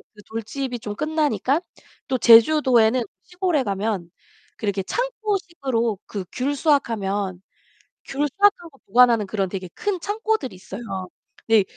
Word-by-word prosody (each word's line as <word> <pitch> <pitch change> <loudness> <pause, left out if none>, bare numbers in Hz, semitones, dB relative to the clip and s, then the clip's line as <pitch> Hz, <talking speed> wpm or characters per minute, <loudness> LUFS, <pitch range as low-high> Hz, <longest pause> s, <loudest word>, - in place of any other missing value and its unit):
그 210 - -15
돌집이 245 +3 -4
좀 210 -1 -6
끝나니까 300 - +1 0.5
또 260 - 0
제주도에는 240 0 +6 0.2
시골에 360 -6 0
가면 195 -3 -2 0.5
그렇게 200 -2 -1
창고식으로 340 - -2
그 200 -3 -5
귤 275 +3 -1
수확하면 205 - 0 0.6
귤 290 +2 -1
수확하고 350 -8 +2
보관하는 230 -1 +5
그런 195 -2 -1
되게 185 -1 -5
큰 400 -3 -2
창고들이 420 - -2
있어요. 190 +4 -9 0.7
근데 220 -3 +5
245 Hz, 290 characters per minute, -23 LUFS, 205-310 Hz, 0.7 s, 제주도에는